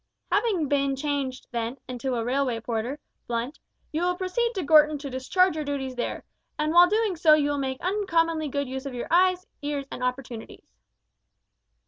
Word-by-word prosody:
"Having 405 -8 +2
been 275 -1 +1
changed, 275 -2 -2
then, 235 +1 -3
into 255 0 -3
a 230 -1 -2
railway 255 -2 0
porter, 235 +5 -3 0.3
Blunt, 240 +4 -3 0.3
you 315 - -1
will 360 0 +1
proceed 430 +6 0
to 380 - -1
Gorton 300 0 +5
to 280 -1 -7
discharge 365 +9 +2
your 310 - -2
duties 275 -2 -3
there, 245 - -3 0.3
and 305 +1 0
while 350 +1 +8
doing 425 -2 +1
so 315 -2 +6
you 290 -1 +1
will 290 - -1
make 265 -1 -2
uncommonly 330 -5 +1
good 280 0 -2
use 265 +2 -5
of 260 - -6
your 240 - -3
eyes, 365 +1 +4 0.2
ears, 285 -1 -3
and - - -5
opportunities." 250 -2 -4
285 Hz, 175 wpm, -26 LUFS, 260-340 Hz, 0.3 s, while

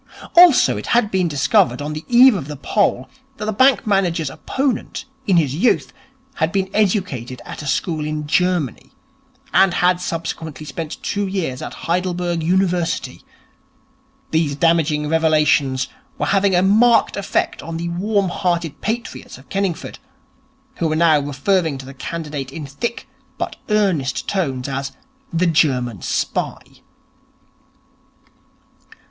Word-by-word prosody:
Also 345 -5 +7
it - - -6
had 220 -3 +1
been 185 -2 +1
discovered, 130 -4 +2
on 150 +1 -4
the 155 +1 -6
eve 250 +1 +7
of 165 -9 -4
the 150 - -6
poll, 200 +8 0 0.3
that 210 - -4
the 215 - -1
bank 260 +5 +4
manager's 175 -8 +1
opponent, 265 - -3 0.2
in 190 -3 +4
his 145 -6 +2
youth, 195 - +1 0.4
had 160 +1 +1
been 190 0 -1
educated 180 - 0
at - - -8
a 145 - -7
school 155 +3 -1
in 150 0 -3
Germany, 155 -5 0 0.6
and 190 -1 +4
had 180 0 +2
subsequently 160 -2 -5
spent 155 +2 -6
two 205 -1 -1
years 175 -10 -3
at - - -6
Heidelberg 175 -1 -1
University. 180 0 0 1.1
These 160 -3 +1
damaging 155 -1 +2
revelations 150 -4 +2 0.3
were - - -1
having 195 -1 +2
a 180 - +3
marked 225 +5 +4
effect 200 -1 -1
on 165 0 -6
the 170 +1 -3
warm 195 +2 0
hearted 170 -4 -2
patriots 230 - -4
of 130 - -18
Kenningford, 195 -4 -3 0.8
who 165 - 0
were 155 - 0
now 160 -2 +4
referring 145 +3 0
to 135 - -9
the 135 - -10
candidate 150 -2 -5
in 155 0 -6
thick 140 - -5 0.3
but - - -4
earnest 190 -11 0
tones 135 -10 -1
as 135 0 -4 0.4
'the 170 +1 +1
German 130 - +1
Spy'. - - -3
165 Hz, 140 wpm, -20 LUFS, 145-195 Hz, 1.1 s, Also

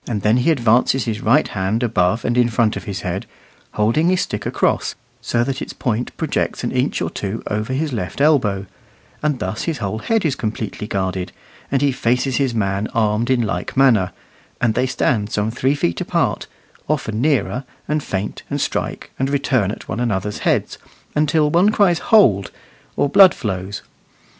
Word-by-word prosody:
Then 110 0 +1
he 125 +6 +2
advances 125 -2 +3
his 110 -3 -3
right 135 +8 +3
hand 105 +4 -1
above 110 -2 +1
and 120 - +1
in 120 -1 +3
front 115 -1 +1
of - - -6
his 100 -3 -4
head, 90 +1 -4 0.5
holding 115 +11 +2
his 185 0 +2
stick - - -3
across, - - 0 0.3
so 120 0 0
that 135 +2 -3
its - - -5
point 120 0 -2
projects - - -1
an - - -1
inch - - 0
or - - -3
two 105 +3 -4
over 105 +4 -2
his 145 +2 -1
left 95 +1 -4
elbow; 125 -10 +2 0.6
and 150 -2 0
thus 95 -1 -3
his 165 -3 -1
whole 105 -1 -3
head 225 - 0
is 150 - +2
completely 110 -3 -4
guarded, 95 -2 -2 0.4
and 135 0 +1
he 140 - +3
faces 125 +1 0
his 135 -4 0
man 100 -1 0
armed 110 +1 +1
in 125 -2 +3
like 90 +2 -3
manner; 115 -9 +4 0.5
and 115 -2 +2
they 130 +3 +1
stand 120 -4 0
some 105 +1 0
three 130 +4 +1
feet 85 -11 -1
apart, - - 0 0.4
often 115 -7 -1
nearer, 140 -2 +1 0.2
and 150 0 0
feint, 100 -5 -4
and - - -2
strike, - - -3
and 135 +1 0
return 135 -7 +1
at 105 - -7
one - - -3
another's 105 -4 -1
heads, - - 0 0.3
until 150 0 +2
one 180 +6 +4
cries 195 -6 +3
"hold," 125 - +4 0.5
or - - +3
blood 190 +5 +7
flows. 95 -1 -4
120 Hz, 180 wpm, -20 LUFS, 105-140 Hz, 0.6 s, blood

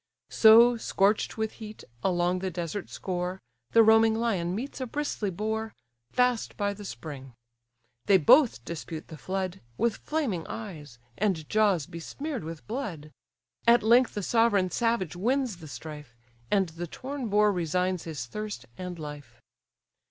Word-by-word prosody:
So, 235 +2 +7
scorch'd 205 -1 +1
with 220 -1 -1
heat, 215 -1 -9 0.2
along 180 0 +1
the 190 0 -2
desert 175 +2 -4
score, 180 0 -3 0.3
The 230 - +6
roaming 220 0 +5
lion 195 -7 0
meets 265 +5 -5
a 255 - -2
bristly 285 -6 -2
boar, 220 +4 -3 0.4
Fast 250 -2 +1
by 205 -1 0
the 205 0 -10
spring; 135 -9 -8 0.7
they 200 - +7
both 190 - +5
dispute 160 -1 -6
the 160 - -9
flood, 190 0 -3 0.2
With 235 -2 +1
flaming 255 - -2
eyes, 165 - -8 0.2
and 180 -7 0
jaws 205 -8 +2
besmear'd 260 - -6
with 160 -1 -8
blood; 190 - -5 0.6
At 235 -1 +6
length 240 +3 +4
the 205 - -2
sovereign 205 -4 +3
savage 230 -8 0
wins 245 +2 0
the 160 -2 -11
strife; 150 -4 -9 0.3
And 195 -4 +2
the 170 +2 -6
torn 260 - -5
boar 210 +1 +4
resigns 180 0 -1
his 150 -7 -5
thirst 210 - -6
and 180 -1 -5
life. 145 -6 -9
195 Hz, 145 wpm, -28 LUFS, 170-225 Hz, 0.7 s, So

